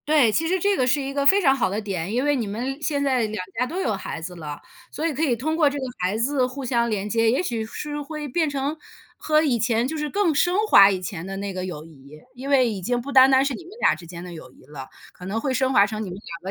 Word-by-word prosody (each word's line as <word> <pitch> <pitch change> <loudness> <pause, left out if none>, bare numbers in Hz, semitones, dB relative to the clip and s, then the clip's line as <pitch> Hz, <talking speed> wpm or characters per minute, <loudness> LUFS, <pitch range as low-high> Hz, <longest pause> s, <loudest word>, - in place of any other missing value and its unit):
对， 295 -7 +4
其 325 +9 0
实 370 +2 +1
这 400 +3 +2
个 255 - +1
是 285 - +2
一 275 0 -4
个 280 0 -1
非 390 +8 +6
常 270 -6 +4
好 255 - 0
的 200 +3 -2
点。 195 -4 -4
因 250 +5 0
为 290 0 +2
你 235 -5 -2
们 255 +8 -4
现 285 -1 -1
在 260 -3 +1
两 210 -3 -4 0.2
家 250 - +2
都 350 +7 -4
有 225 - 0
孩 195 -3 -5
子 180 +2 -7
了， 150 -3 -7 0.3
所 310 - -4
以 320 - -2
可 285 - -4
以 260 -6 +2
通 310 +7 -2
过 310 -3 +4
这 285 - -5
个 270 - -3
孩 185 +4 -1
子 255 +3 +1
互 265 +1 -7
相 235 -1 +1
连 205 -2 -2
接， 225 +2 +2
也 255 - +1
许 230 -9 -2
是 295 +6 -5
会 300 0 -6
变 315 +3 0
成 285 +1 -2 0.4
和 305 0 +2
以 255 -6 +1
前 235 +1 +1
就 315 - -4
是 300 -1 -3
更 395 -3 +1
升 350 +5 +2
华 200 - +8
以 190 -2 -1
前 180 -1 -6
的 195 0 -6
那 200 0 -4
个 185 0 -4
友 160 -4 -7
谊。 150 -1 -15
因 260 +2 -7
为 265 -3 +4
已 210 -4 -4
经 245 +6 -1
不 270 +4 -6
单 265 -1 +7
单 265 0 +4
是 275 - -1
你 350 - -8
们 355 - -14
俩 - - +4
之 170 - -10
间 170 0 -9
的 180 -1 -8
友 155 -6 -11
谊 130 - -21
了， 135 -2 -9 0.3
可 180 - -12
能 205 +4 -2
会 265 +3 -1
升 260 +1 +1
华 200 -6 +5
成 215 +1 -5
你 200 - -6
们 - - -6
两 175 -2 -8
245 Hz, 315 characters per minute, -23 LUFS, 195-285 Hz, 0.4 s, 华